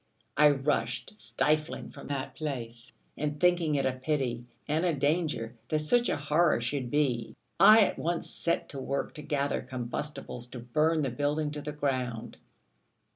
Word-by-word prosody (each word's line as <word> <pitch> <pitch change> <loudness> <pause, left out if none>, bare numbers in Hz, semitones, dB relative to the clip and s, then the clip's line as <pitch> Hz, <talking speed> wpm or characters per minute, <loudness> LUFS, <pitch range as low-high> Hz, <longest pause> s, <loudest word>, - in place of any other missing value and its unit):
I 150 +1 +7
rushed 135 -5 -1
stifling 135 +8 -1
from - - -11
that 140 -1 -3
place; 120 -5 -5 0.2
and 150 0 -3
thinking 175 -3 +3
it 140 - +1
a 130 - +3
pity, 130 -3 -2 0.2
and 155 +3 +1
a 175 -3 +2
danger, 145 -5 0 0.2
that 155 - +2
such 235 +11 +2
a - - +1
horror 150 +1 +3
should 125 +1 -2
be, 125 -5 0 0.2
I 220 +1 +9
at - - -1
once 170 +1 -1
set 170 - -1
to 140 - -6
work 135 +1 -2
to 150 - -8
gather 145 -2 -1
combustibles 125 0 -5
to 125 - -8
burn 155 +7 +1
the 135 - -1
building 145 +4 0
to 150 0 -5
the 150 - -4
ground. 130 -5 -2
145 Hz, 165 wpm, -29 LUFS, 125-155 Hz, 0.2 s, I